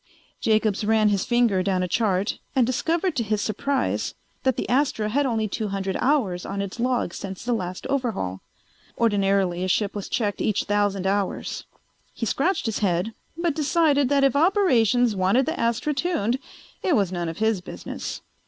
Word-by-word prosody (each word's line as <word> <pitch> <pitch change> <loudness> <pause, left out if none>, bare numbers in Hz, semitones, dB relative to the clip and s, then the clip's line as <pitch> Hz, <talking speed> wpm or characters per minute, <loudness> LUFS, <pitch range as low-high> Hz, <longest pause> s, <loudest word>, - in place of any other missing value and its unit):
Jacobs 215 -2 +1
ran 215 0 +3
his 200 -2 0
finger 240 -6 +3
down 185 -1 0
a - - -1
chart 200 0 0 0.2
and 255 -3 +4
discovered 325 +8 0
to 250 - +1
his 215 -1 0
surprise 255 +6 -1 0.3
that 260 -2 +1
the - - -2
Astra 255 -5 +1
had 280 +5 +1
only 220 -3 0
two 215 +1 -3
hundred 195 -1 -2
hours 230 -11 +1
on 200 - -4
its 200 +3 -4
log 245 -7 0
since 195 +2 -7
the 245 - +1
last 180 -5 -4
overhaul. 225 - -2 0.6
Ordinarily 195 -5 +2
a - - 0
ship 200 +2 +1
was 205 -2 -5
checked 205 -4 -1
each 210 -1 +1
thousand 205 -2 0
hours. 200 0 -1 0.5
He 230 - -2
scratched 300 - 0
his 225 -2 -1
head 190 +2 0 0.2
but 340 -2 0
decided 295 -2 +2
that 280 -1 +3
if 275 -1 +3
Operations 250 - +3
wanted 195 +8 +3
the 320 +3 -3
Astra 235 +6 0
tuned 265 - 0 0.4
it 355 - +2
was 195 -4 +1
none 175 -2 -2
of 165 - -7
his 220 -3 +1
business. - - -6
220 Hz, 175 wpm, -24 LUFS, 195-260 Hz, 0.6 s, and